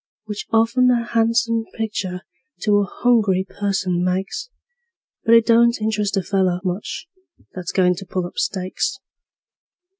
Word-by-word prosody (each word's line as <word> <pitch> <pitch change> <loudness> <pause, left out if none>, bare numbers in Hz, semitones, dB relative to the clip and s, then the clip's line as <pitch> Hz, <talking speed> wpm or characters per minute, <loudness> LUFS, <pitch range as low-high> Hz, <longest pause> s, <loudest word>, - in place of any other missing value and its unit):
Which 210 -1 -6
often 230 +3 +3
a 240 -1 +2
han'some 230 0 +1
pictur' 195 -5 -3 0.4
to 210 -2 +3
a 200 - +1
hungry 205 -5 +2
person 190 -3 -1
makes, 190 - -2 0.8
But 230 0 +6
it 230 -1 +5
don't 235 0 +4
interest 210 -2 -1
a 195 - 0
feller 185 -2 +1
much 185 - -4 0.5
that's 180 -2 -5
goin' 180 -1 +3
to 195 - -8
pull 185 -1 -2
up 175 - -6
stakes. 185 -1 -2
205 Hz, 140 wpm, -21 LUFS, 185-230 Hz, 0.8 s, But